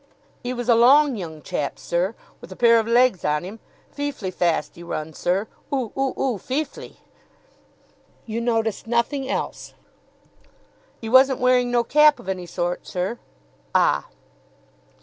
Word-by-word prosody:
"'E 245 - -3
was 245 -1 -4
a 240 - +6
long 265 +4 +5
young 160 -6 -7
chap, 145 - -3
sir, 180 +6 -1 0.3
with - - -12
a - - -8
pair 230 +1 +5
of 220 - -2
legs 240 -4 +3
on 150 +1 0
him 200 +5 -8 0.3
feeflee 285 -10 -4
fast 170 -4 -1
'e 170 - -12
run, 160 -2 -5
sir. 190 +7 -1 0.2
Oo 260 -6 -2
oo 270 -1 -1
oo, 255 -5 0
feeflee!" 280 - -5 1.3
"You 230 +1 -3
noticed 225 -2 -1
nothing 250 +4 0
else?" - - -4 1.3
"'E - - -4
wasn't 260 +1 +5
wearing 250 -1 +3
no 240 -1 +2
cap 300 +4 +5
of - - -13
any 185 -2 -4
sort, 175 +1 -3
sir." 185 +6 -3 0.6
"Ah!" 70 0 +3
230 Hz, 150 wpm, -23 LUFS, 180-255 Hz, 1.3 s, a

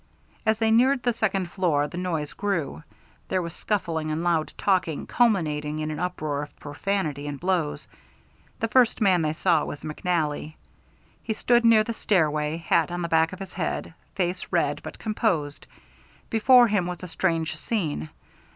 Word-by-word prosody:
As 220 0 +3
they 225 0 +2
neared 255 +3 +4
the 245 - +2
second 195 -5 -1
floor 155 -7 +1
the 150 - -10
noise 165 -5 -2
grew. 170 - -2 0.5
There 185 - 0
was 170 -1 -6
scuffling 165 -7 -2
and 155 +2 -2
loud 170 -3 +1
talking, 185 -6 0
culminating 155 -10 +1
in 155 0 -2
an 150 - -5
uproar 155 -5 -2
of 145 - -10
profanity 150 -2 -2
and 145 -1 -5
blows. 175 -5 -1 0.7
The 225 - +1
first 245 +1 +3
man 190 -5 +4
they 155 -1 0
saw 165 -1 +2
was 145 - -6
McNally. 155 -1 -2 0.7
He 220 - -3
stood 240 +1 +3
near 225 -2 +6
the 230 - -4
stairway, 155 -7 +1
hat 170 +1 +1
on 175 0 -3
the 170 - -2
back 160 0 +3
of 185 - -7
his 195 -1 -8
head, 170 -2 -3 0.2
face 180 -1 -1
red - - 0
but - - -8
composed. 180 -10 -1 0.6
Before 240 +2 +6
him 200 -5 +1
was 180 0 -6
a - - -5
strange 165 -2 -1
scene. 155 - -2
175 Hz, 170 wpm, -25 LUFS, 155-205 Hz, 0.7 s, near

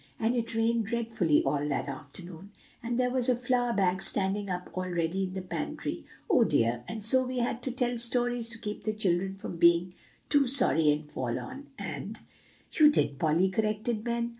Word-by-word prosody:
And 230 +2 +1
it 230 -1 -2
rained 225 -1 +1
dreadfully 225 -9 +1
all 145 0 -1
that 140 - -2
afternoon; 160 +6 -9 0.3
and 235 +1 -2
there 250 0 +1
was 255 -1 -1
the 250 - +3
flour 245 0 0
bag 190 -3 +1
standing 200 +1 0
up 180 0 -4
all 185 0 -3
ready 175 +2 -1
in 185 0 -7
the 190 - -4
pantry, 180 - -5 0.2
oh, 280 - +4
dear! 120 - +1
and 220 -2 -6
so 260 +3 +5
we 255 0 -4
had 240 0 -1
to 260 - -2
tell 245 -1 -1
stories 240 0 +2
to 235 - -2
keep 210 -2 -6
the 215 +1 -2
children 190 -2 0
from 195 -3 -7
being 170 +1 +4 0.3
too 285 -3 +3
sorry 240 - +4
and 150 +1 -3
forlorn, 260 - -5
and" - - -5 0.5
"You 305 -2 +6
did, 145 - +1
Polly," 165 +5 +2
corrected 215 +2 -1
Ben. 235 0 -1
215 Hz, 190 wpm, -29 LUFS, 175-240 Hz, 0.5 s, You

